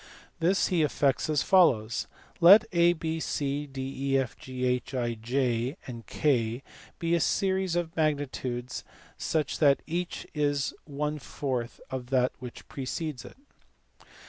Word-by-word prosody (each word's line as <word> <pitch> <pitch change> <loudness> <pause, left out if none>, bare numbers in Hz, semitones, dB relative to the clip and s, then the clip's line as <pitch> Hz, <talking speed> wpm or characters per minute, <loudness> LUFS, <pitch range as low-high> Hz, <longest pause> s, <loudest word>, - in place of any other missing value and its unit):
This 180 +4 +2
he 180 -4 +2
effects 145 -2 +1
as 150 -3 +2
follows. 120 - +3 0.3
Let 185 +5 +9
A, 170 -1 +5
B, 160 -1 -3
(7,..., 145 -1 -2
Jj 130 -2 -1 0.3
K 120 -3 0 0.3
be 165 0 0
a 170 - +4
series 190 +1 +1
of 170 -2 -2
magnitudes 130 -5 -2 0.4
such 155 -3 -1
that 140 -3 +4
each 175 +2 -3
is 145 -3 0
one 150 +1 -3
fourth 125 -3 -4
of 130 -2 -4
that 130 -1 +2
which 125 -1 -9
precedes 140 +1 -4
it. - - -12
140 Hz, 115 wpm, -28 LUFS, 125-160 Hz, 0.4 s, Let